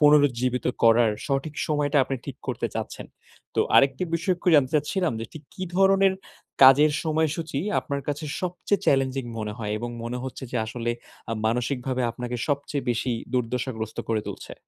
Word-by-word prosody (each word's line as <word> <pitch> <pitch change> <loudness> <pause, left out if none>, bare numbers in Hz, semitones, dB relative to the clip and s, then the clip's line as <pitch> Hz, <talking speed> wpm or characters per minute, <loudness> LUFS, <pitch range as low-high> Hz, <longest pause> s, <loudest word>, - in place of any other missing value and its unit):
পুনরুজ্জীবিত 130 -4 +4 0.2
করার 115 0 +6 0.2
সঠিক 140 +2 -1
সময়টা 145 -1 0
আপনি 135 - -3
ঠিক - - -6
করতে - - -1
চাচ্ছেন। - - -5 0.5
তো - - +2 0.2
আরেকটি 135 +3 +4
বিষয় 170 +3 +1
একটু 175 - -2
জানতে 135 -4 +5
চাচ্ছিলাম 155 +3 +1
যে, - - -3 0.3
কী 185 - -7
ধরনের 195 0 +5 0.5
কাজের 140 +3 +8
সময়সূচী 160 -1 0 0.2
আপনার 140 -1 -3
কাছে 145 +2 -2 0.2
সবচেয়ে 180 +2 -1
চ্যালেঞ্জিং 135 -1 +2
মনে 105 -1 -3
হয়? 105 -2 -3
এবং 120 +2 -4
মনে 120 +1 -3
হচ্ছে 130 +1 -6
যে, - - -2
আসলে 120 +1 -3 0.4
আ - - 0
মানসিকভাবে 125 +2 -1
আপনাকে 125 0 -5
সবচেয়ে 145 0 -1
বেশি 120 +1 0 0.2
দুর্দশাগ্রস্ত 120 -2 -2
করে 110 -1 +1
তুলছে। - - -7
135 Hz, 155 wpm, -25 LUFS, 120-150 Hz, 0.5 s, কাজের